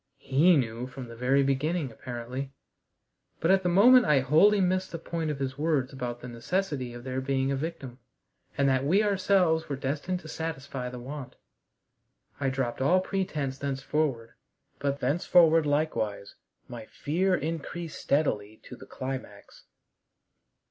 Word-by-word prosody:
He 155 +6 +4
knew 120 -1 -2
from 130 -1 -8
the 115 - -9
very 130 +4 +2
beginning, 140 +2 0
apparently. 125 +3 -6 0.9
But 165 - +2
at 190 0 +4
the 180 - 0
moment 245 +8 +7
I 140 -3 +4
wholly 160 +11 +5
missed 185 0 +1
the 170 - -4
point 165 -1 -3
of 150 - -2
his 135 0 -4
words 145 -4 0
about 120 -2 -5
the 125 - -7
necessity 130 +2 -2
of 120 - -9
there 130 0 -3
being 135 0 0
a - - +1
victim, 135 -4 -6 0.6
and 140 - +3
that 130 -1 +2
we 185 +9 +3
ourselves 185 -5 +2
were 140 - -1
destined 145 +7 -2
to 155 - -11
satisfy 140 -6 -5
the 125 - -8
want. 135 +2 -8 1.0
I 140 -2 +1
dropped 130 -2 -2
all 175 +8 +4
pretense 155 -8 -3
thenceforward, 135 -3 -2 0.5
but 140 0 -2
thenceforward 165 +3 +4
likewise 145 -9 -1 0.3
my 115 -3 -9
fear 185 +5 0
increased 165 +1 -5
steadily 110 -8 0
to - - -10
the - - -13
climax. 130 0 -7
140 Hz, 150 wpm, -28 LUFS, 130-165 Hz, 1.0 s, moment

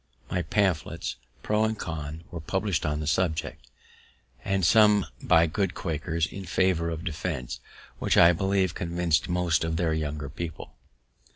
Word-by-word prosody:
Many 90 - +1
pamphlets 90 -1 -1 0.3
pro 105 +1 +2
and 110 0 0
con 80 -2 -5
were 85 - -5
publish'd 95 -1 -1
on 75 0 -1
the - - -3
subject, 80 +1 -1 0.8
and 95 -2 +1
some 105 0 +5 0.2
by 85 0 +5
good 95 +3 -1
Quakers, 80 0 -1
in 95 +2 -8
favour 85 -2 +1
of 80 0 -4
defense, 80 -5 -4 0.4
which - - +1
I 85 +1 +8
believe 95 0 +1
convinc'd 85 -1 0
most 90 -2 +1
of 80 0 -1
their 85 -2 +1
younger 75 -2 -3
people. 80 +3 -7
85 Hz, 150 wpm, -27 LUFS, 80-95 Hz, 0.8 s, I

